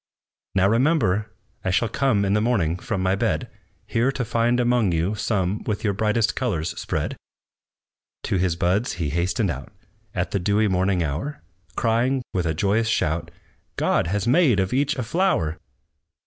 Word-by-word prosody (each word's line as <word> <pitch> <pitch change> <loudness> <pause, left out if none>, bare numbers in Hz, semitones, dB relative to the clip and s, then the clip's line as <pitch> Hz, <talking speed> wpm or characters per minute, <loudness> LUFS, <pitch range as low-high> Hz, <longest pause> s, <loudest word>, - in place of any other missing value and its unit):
"Now 95 0 +4
remember! 115 - +2 0.3
I - - -1
shall 95 +6 +2
come 110 -6 +1
In 100 - +1
the 105 - +2
morning 100 -9 +1
from 95 +1 -3
my 95 0 +2
bed, 95 -6 -1 0.3
Here 120 +4 +1
to 125 - -2
find 120 +2 +1
among 120 -6 +2
you 85 +5 0
some 105 -2 -1
With 105 -2 -2
your 105 -2 +1
brightest 110 +2 +1
colors 90 -11 -1
spread!" - - -3 1.1
To - - 0
his 90 -2 +1
buds 90 +7 +1
he 80 -5 -2
hastened 85 +2 0
out, - - -7 0.4
At - - -1
the 100 - 0
dewy 105 +4 +2
morning 95 -1 +1
hour, 85 - -4 0.3
Crying, 120 +3 +1
with 90 -3 0
a 80 - -1
joyous 105 +6 +1
shout, 85 -6 0 0.5
"God - - +1
has 105 +4 -1
made 130 - +4
of 95 +3 0
each 140 +3 +1
a 130 - -2
flower!" 115 - 0
105 Hz, 165 wpm, -23 LUFS, 90-120 Hz, 1.1 s, Now